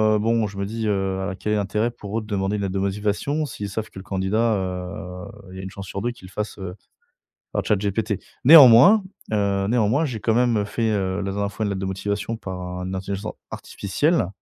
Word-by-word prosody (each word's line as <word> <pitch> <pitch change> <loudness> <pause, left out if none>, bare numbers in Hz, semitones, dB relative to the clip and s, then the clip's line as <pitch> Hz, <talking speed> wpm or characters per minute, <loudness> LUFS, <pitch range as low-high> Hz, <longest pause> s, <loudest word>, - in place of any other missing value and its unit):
heu, - - +3
bon! 115 0 +1
Je 100 - -10
me 100 - -1
dis: 110 +1 -3
«Heu, 95 -1 -1
quel 105 - -3
est - - +2
l'intérêt 105 +3 0
pour 105 -2 -6
eux 115 - -1
de - - -10
demander 100 -1 -1
une 105 - -2
lettre 95 -1 -2
de 95 - -1
motivation 105 +10 -1
s'ils 105 -7 -5
savent 110 +2 -4
que 95 - -10
le - - -9
candidat, 100 +4 +1
heu, 90 -1 -5 0.3
il 95 - -9
y - - -7
a - - -6
1 - - -4
chance 95 0 -9
sur 100 - -5
2 120 +3 -1
qu'il 95 -6 -13
le - - -18
fasse, 105 +3 -4
heu, 95 -2 -6 0.8
par - - -1
ChatGPT?» 105 0 0 0.3
néanmoins, 150 - +9 0.3
heu, 100 -2 +1
néanmoins, 120 +6 +2
j'ai 125 -7 -4
quand 110 +2 +1
même, 120 -2 +3
heu, - - +1
fait, 110 +2 -1
heu, 95 -2 0
la 100 - -2
dernière 100 +1 -2
fois 110 - -3
une 100 - -1
lettre 95 - -3
de 95 - -2
motivation 100 +4 -3
par 95 -4 -6
un 90 +1 -5
intelligence 100 +2 -4 0.2
artificielle 145 - 0
100 Hz, 235 wpm, -23 LUFS, 95-110 Hz, 0.8 s, néanmoins